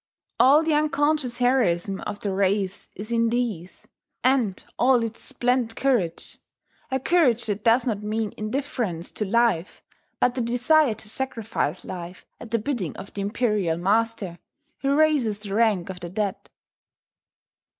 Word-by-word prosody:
All 285 +5 +6
the 320 -1 +1
unconscious 295 -4 +1
heroism 200 -7 +1
of 205 - -6
the 200 - -2
race 195 0 0
is 215 +3 -7
in 230 -1 +2
these, 225 -8 -3 0.4
and 245 -7 +2 0.2
all 250 -1 +4
its 230 0 -5
splendid 245 -3 0
courage, 235 -13 0 0.5
a 265 0 0
courage 260 -6 +3
that 205 -1 -2
does 235 +2 +4
not 215 -5 -1
mean 215 0 -2
indifference 215 - -3
to 210 - -3
life, 210 -4 +1 0.4
but 245 - +3
the 255 - -2
desire 245 +2 +3
to 220 - -9
sacrifice 225 - -3
life 180 0 -8
at 235 - -9
the 230 - +1
bidding 210 - -3
of 195 - -9
the 200 - -4
Imperial 205 -5 0
Master 200 -1 0 0.4
who 275 0 +1
raises 290 -9 +3
the 205 -1 -7
rank 205 -5 +2
of 180 - -9
the 175 -1 -6
dead. 200 +2 -3
225 Hz, 150 wpm, -24 LUFS, 200-250 Hz, 0.5 s, All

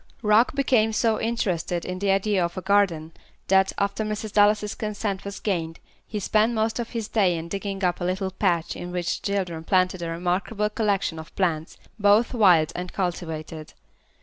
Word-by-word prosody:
Rock 215 +5 +4
became 245 -5 +2
so 220 0 +1
interested 185 -7 -1
in 185 0 -4
the 200 0 0
idea 195 -1 +2
of 170 +1 -3
a - - -2
garden, 190 -6 +2 0.4
that, 190 0 +4
after 200 +2 -1
Mrs. 215 0 -4
Dallas's 210 0 +3
consent 210 -2 -3
was 200 0 -6
gained, 165 -5 -2 0.3
he 210 - -4
spent 215 +3 +2
most 220 +1 0
of 235 - -4
the 230 - -2
day 195 -5 +1
in 165 +1 -6
digging 195 +1 -4
up 180 -1 0
a - - -1
little 190 +1 -1
patch 175 -3 0
in 175 - -6
which 175 -1 -2
the - - -3
children 175 -5 -2
planted 185 0 +1
a 170 - -3
remarkable 185 +5 -1
collection 200 -6 0
of 160 - -11
plants, 165 -4 -1 0.2
both 205 +4 +4
wild 180 -9 +5
and 180 0 -5
cultivated. 160 -4 -4
195 Hz, 180 wpm, -24 LUFS, 175-210 Hz, 0.4 s, wild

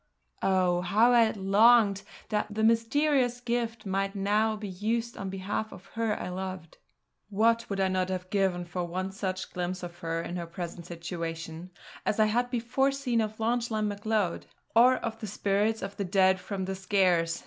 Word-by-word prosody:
Oh! 180 -2 +2
how 220 +6 +4
I 230 -2 +6
longed 205 +1 +4 0.3
that 210 -1 0
the 220 - 0
mysterious 245 +3 +2
gift 235 -2 -2
might 195 +1 -1
now 210 +2 +1
be 210 -1 -6
used 225 +5 -2
on 195 - -5
behalf 195 +3 -3
of 185 - -12
her 225 -2 -1
I - - -4
loved. 185 -2 -6 0.5
What 230 +3 +2
would 200 -1 -2
I 190 - +3
not 185 0 0
have 185 0 -4
given 190 -3 +1
for 175 +1 -3
one 185 +2 -3
such 190 -1 -4
glimpse 180 +1 -3
of 175 0 -8
her 165 0 -2
in 175 +1 -4
her 170 -1 -5
present 170 0 -7
situation, 165 0 -6 0.3
as 215 - -1
I 215 - +6
had 240 +3 +1
before 250 +3 +1
seen 255 -4 0
of 215 0 -3
Lauchlane 225 -2 0
Macleod, 205 -3 -1 0.3
or 250 +3 +7
of 225 0 -5
the 215 - -5
spirits 205 +2 0
of 195 +1 -6
the 200 - -1
Dead 190 0 +3
from 190 0 -4
the 190 - -3
Skares. 185 -3 +1
200 Hz, 180 wpm, -28 LUFS, 185-225 Hz, 0.5 s, or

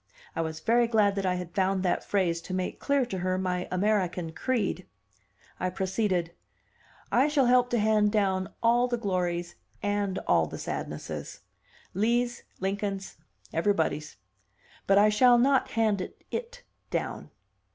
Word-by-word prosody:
I - - 0
was 160 -1 -4
very 235 +4 +3
glad 215 -3 +3
that 195 -1 -1
I 180 - +1
had 180 -1 -6
found 190 -1 +1
that 180 - 0
phrase 175 -4 0
to 185 - -5
make 185 -1 -3
clear 280 -2 +1
to 195 -6 -4
her 185 +1 0
my 180 -1 -2
American 185 -3 0
creed. 225 +3 -1 0.7
I 185 - 0
proceeded. 185 -2 -1 0.8
"I 260 +4 +4
shall 295 -3 +3
help 245 0 +4
to 240 - +1
hand 210 -1 +3
down 190 -3 0
all 240 +2 +4
the 240 -1 -1
glories 175 -4 -2 0.3
and 205 -2 0
all 85 -2 +3
the - - -7
sadnesses; - - -5 0.5
Lee's, 240 +4 +1 0.2
Lincoln's, 195 0 -3 0.4
everybody's. 160 -4 0 0.7
But 195 - +5
I 210 +1 +6
shall 240 +3 +5
not 265 +2 +3
hand 215 -4 0 0.2
'it' 485 +1 -5 0.3
down." - - -3
200 Hz, 145 wpm, -28 LUFS, 180-230 Hz, 0.8 s, I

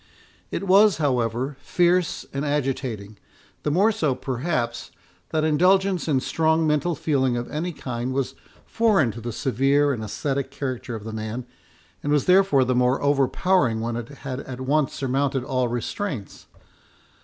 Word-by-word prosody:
It - - -3
was, 200 +1 +5
however, 130 -2 0
fierce 175 -1 +1
and 140 +1 -2
agitating, 130 -8 -2 0.4
the - - -1
more 195 +9 +3
so, 150 -10 0
perhaps, 125 -3 -2 0.4
that 155 -1 0
indulgence 185 +4 +3
in 135 -4 +2
strong 160 +2 +1
mental 155 +2 +1
feeling 135 -5 +1
of 120 - -4
any 165 +4 -2
kind 125 -4 -4
was 135 0 -1 0.3
foreign 205 - +2
to 115 +3 -9
the 120 +1 -4
severe 135 +5 +2
and 110 -4 -4
ascetic 135 +6 -2
character 130 -3 -4
of 110 - -7
the 110 0 -6
man, 110 +3 -4 0.6
and 145 - -2
was 145 -2 +2
therefore 180 -7 +5
the 130 - +1
more 125 +1 +2
overpowering 140 -1 +2
when 115 +1 -2
it 120 -1 -4
had 135 -2 -6
at 130 -2 -7
once 140 +1 +1
surmounted 135 0 0
all 130 -1 0
restraints. 120 - -4
135 Hz, 155 wpm, -24 LUFS, 125-155 Hz, 0.6 s, was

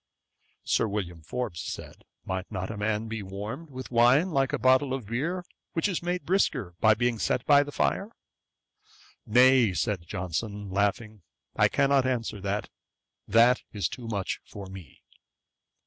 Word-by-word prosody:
Sir - - +1
William 90 -5 -4
Forbes 85 +1 -4
said, - - -8 0.2
'Might 95 +1 -4
not 95 0 -3
a 110 - -6
man 105 +1 -1 0.2
warmed 110 +12 -6
with 130 -2 -8
wine 125 +9 +5
be - - -7
like 135 -3 +1
a - - 0
bottle 130 +1 +3
of 130 -5 -6
beer, 160 - -2 0.3
which 165 +4 +1
is 190 -4 -2
made 175 +1 -2
brisker 135 - +1
by 110 0 +5
being 120 0 0
set 120 - +1
before 145 -1 +6
the 145 - -8
fire?' 200 +8 0 1.2
'Nay, 125 -2 +5
(said 95 -6 -1
Johnson, 100 +2 -4
laughing,) 105 +2 -1 0.3
I - - +5
cannot 140 -2 +2
answer 115 -5 -2
that: 100 +2 -3 0.6
that 115 +4 +5
is 100 -6 0
too 120 -3 -8
much 100 -4 -3
for 100 -1 -9
me.' 95 -6 -12
115 Hz, 155 wpm, -27 LUFS, 100-135 Hz, 1.2 s, before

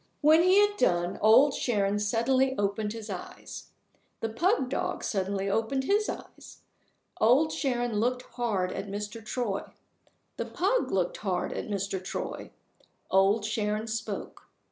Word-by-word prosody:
When 310 +2 +6
he 365 +2 +5
had 410 0 +4
done, 175 - +1
Old 245 +7 +6
Sharon 205 -5 0
suddenly 255 +5 +2
opened 205 +1 -1
his 220 -1 -7
eyes. 190 -4 -8 0.5
The 225 - -1
pug 330 - +1
dog 260 - -2
suddenly 195 -1 -1
opened 225 +6 0
his 415 +8 +1
eyes. - - -9 0.6
Old 275 +8 +4
Sharon 245 -5 -1
looked 250 +2 0
hard 210 -7 -1
at 195 +2 -5
Mr. 210 +3 -5
Troy. 215 -3 -2 0.8
The - - -3
pug 415 +7 0
looked 185 -2 0
hard 185 -4 -2
at - - -5
Mr. 195 -2 -3
Troy. - - -5 0.6
Old 195 +3 +3
Sharon 215 0 -1
spoke. 225 0 -5
220 Hz, 140 wpm, -28 LUFS, 200-260 Hz, 0.8 s, When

